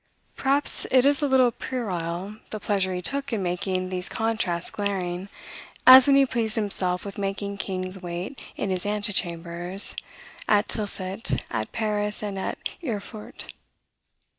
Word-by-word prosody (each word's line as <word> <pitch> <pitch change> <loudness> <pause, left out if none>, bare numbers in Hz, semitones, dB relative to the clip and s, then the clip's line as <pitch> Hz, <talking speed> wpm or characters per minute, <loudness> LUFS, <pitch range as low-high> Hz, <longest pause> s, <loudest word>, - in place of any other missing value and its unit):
Perhaps 275 +2 +3
it 255 0 +5
is 285 +1 +3
a 290 - +2
little 260 -2 +4
puerile, 190 -5 -4
the 215 - -5
pleasure 195 -2 0
he 180 0 -3
took 280 +3 -1
in 215 -4 -1
making 185 +1 -1
these 180 0 -3
contrasts 215 -6 -1
glaring; 190 -2 -3 0.6
as 255 +1 +11
when 280 - +6
he 275 0 +6
pleased 230 -4 0
himself 190 -4 +1
with 200 0 -7
making 200 0 -3
kings 185 -1 -4
wait 180 +9 -6
in 200 - -2
his 185 -1 -1
antechambers, 180 -3 -1 0.5
at 210 0 +4
Tilsit, 190 - -3
at 110 -1 -3
Paris, 210 -1 -2
and 200 -2 -3
at - - -3 0.3
Erfurt. 215 -4 -6
200 Hz, 140 wpm, -25 LUFS, 185-225 Hz, 0.6 s, as